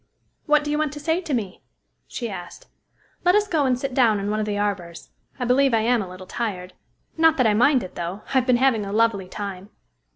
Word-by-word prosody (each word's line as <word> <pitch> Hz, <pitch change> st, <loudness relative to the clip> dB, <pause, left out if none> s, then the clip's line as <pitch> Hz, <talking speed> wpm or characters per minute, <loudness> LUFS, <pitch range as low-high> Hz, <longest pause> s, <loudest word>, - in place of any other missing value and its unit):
"What 300 Hz, 0 st, +4 dB
do 295 Hz, -, -3 dB
you 300 Hz, -, 0 dB
want 305 Hz, -2 st, -1 dB
to 295 Hz, -, -7 dB
say 320 Hz, +4 st, 0 dB
to 335 Hz, -4 st, -7 dB
me?" 200 Hz, -6 st, -4 dB, 0.5 s
she 240 Hz, -, -5 dB
asked. 175 Hz, -5 st, -9 dB, 0.6 s
"Let 360 Hz, +2 st, +4 dB
us 420 Hz, 0 st, +3 dB
go 310 Hz, -7 st, +1 dB
and 250 Hz, -1 st, +2 dB
sit 275 Hz, 0 st, -4 dB
down 230 Hz, -5 st, +3 dB
in 200 Hz, +1 st, -2 dB
one 215 Hz, -, -1 dB
of 215 Hz, -, -2 dB
the 205 Hz, -1 st, -2 dB
arbors. 190 Hz, -5 st, -4 dB, 0.3 s
I 250 Hz, -, -1 dB
believe 255 Hz, 0 st, +3 dB
I 220 Hz, -, +2 dB
am 235 Hz, +1 st, +2 dB
a 190 Hz, -, -6 dB
little 185 Hz, +1 st, -10 dB
tired 185 Hz, -4 st, -4 dB, 0.4 s
not 320 Hz, -1 st, +4 dB
that 255 Hz, -, +3 dB
I 215 Hz, -, +4 dB
mind 255 Hz, +4 st, +3 dB
it, 185 Hz, -, -9 dB
though. 175 Hz, +4 st, -5 dB
I've 260 Hz, -1 st, +2 dB
been 250 Hz, -1 st, +4 dB
having 250 Hz, -4 st, +2 dB
a 200 Hz, -, -5 dB
lovely 215 Hz, -3 st, +1 dB
time." 200 Hz, -1 st, -6 dB
230 Hz, 235 wpm, -23 LUFS, 200-275 Hz, 0.6 s, What